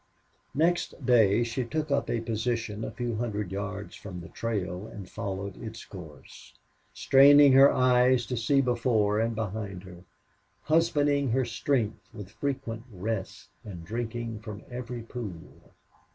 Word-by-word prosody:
Next 165 -2 0
day 115 -3 +4
she 120 +2 -2
took 150 +4 -3
up 140 -1 +1
a 115 - 0
position 115 -1 -2
a - - -3
few 120 -3 -3
hundred 105 -5 -3
yards 100 +1 -5
from 95 -3 -8
the 85 - -10
trail 100 -3 -3
and 100 -3 -9
followed 100 -1 -5
its 115 0 -8
course, 80 -7 -12 0.4
straining 140 +1 +7
her 135 +1 +8
eyes 125 -1 +3
to 125 - -3
see 130 +4 +2
before 115 -4 +1
and 115 0 0
behind 100 -3 -4
her, 90 -2 -12 0.6
husbanding 145 -3 +2
her 130 +2 +1
strength 115 -1 -1
with 100 -2 -9
frequent 125 -5 -4
rests, 100 +1 -5
and 90 -5 -9
drinking 115 +1 -4
from 105 -1 -8
every 120 -1 -6
pool. 110 -8 -9
115 Hz, 140 wpm, -28 LUFS, 105-125 Hz, 0.6 s, her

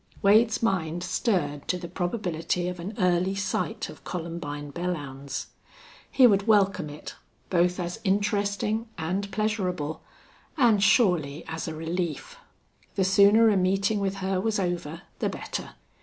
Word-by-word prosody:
Wade's 220 +3 +4
mind 175 -5 0
stirred 145 - -1
to 180 - 0
the 175 -1 -7
probability 175 -1 -2
of 180 -1 -4
an 195 +5 -6
early 180 0 +2
sight 190 -4 -2
of - - -12
Columbine 160 -4 -5
Belllounds. 140 -6 -4 0.6
He 260 - +5
would 200 -2 +4
welcome 195 -6 +3
it, 145 +1 -9 0.4
both 180 0 +2
as 175 +4 -4
interesting 205 +2 0
and 185 +5 -2
pleasurable, 190 -7 -2 0.6
and 230 -7 +4
surely 180 - +3
as 160 0 -4
a 160 - -4
relief. 170 - -4 0.6
The 195 - +2
sooner 200 +4 +6
a 205 - +3
meeting 195 +3 +1
with 195 -1 -1
her 190 -1 0
was 220 0 0
over 175 -2 -3 0.2
the - - 0
better. - - -6
185 Hz, 140 wpm, -26 LUFS, 170-205 Hz, 0.6 s, sooner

